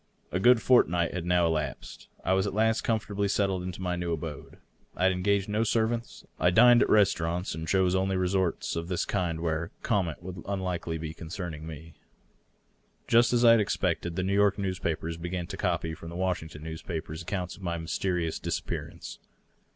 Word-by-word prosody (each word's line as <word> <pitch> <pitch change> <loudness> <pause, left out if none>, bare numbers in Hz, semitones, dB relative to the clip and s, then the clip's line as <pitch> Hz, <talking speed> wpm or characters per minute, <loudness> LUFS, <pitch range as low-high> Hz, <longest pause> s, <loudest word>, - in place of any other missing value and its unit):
A 90 - 0
good 120 +2 +5
fortnight 90 -9 +3
had 90 -2 -4
now 90 -1 +3
elapsed. 75 -4 -3 0.2
I 95 - +3
was 95 +1 +2
at 100 - -4
last 110 +1 +2
comfortably 105 -3 -1
settled 95 -2 0
in 90 +1 -4
my 90 -2 -2
new 85 -1 -3
abode. 80 -2 -6 0.4
I - - -2
had 95 - +5
engaged 100 +2 +1
no 105 +2 +1
servants. 115 +1 -1
I 90 - +4
dined 120 +6 +7
at - - +2
restaurants, 90 -3 +2
and 80 +1 -5
chose 95 +1 +2
only 95 0 +1
resorts 95 -1 0
of 85 0 -3
this 90 -2 -1
kind 85 -5 -1
'where 80 0 -1
comment 90 -7 0
would 90 0 -6
be - - -7
unlikely 90 -4 -2 0.2
concerning 80 -2 -6
me. 80 +1 -9 1.1
Just 120 0 +5
as 120 0 +3
I 115 - +9
had 115 - +6
expected, 90 -4 -1
the 90 - -1
New 95 +1 0
York 100 0 +3
newspapers 85 -4 -2
b^an 85 0 -4
to - - -4
copy 80 -1 -1
from 80 +1 -9
the 85 - -8
Washington 85 -4 -3
newspapers 80 0 -5
accounts 90 0 -4
of - - -16
my 85 -2 -2
mys 80 -1 -4
terious 90 -4 -1
disappearance. - - -5
90 Hz, 185 wpm, -28 LUFS, 85-100 Hz, 1.1 s, I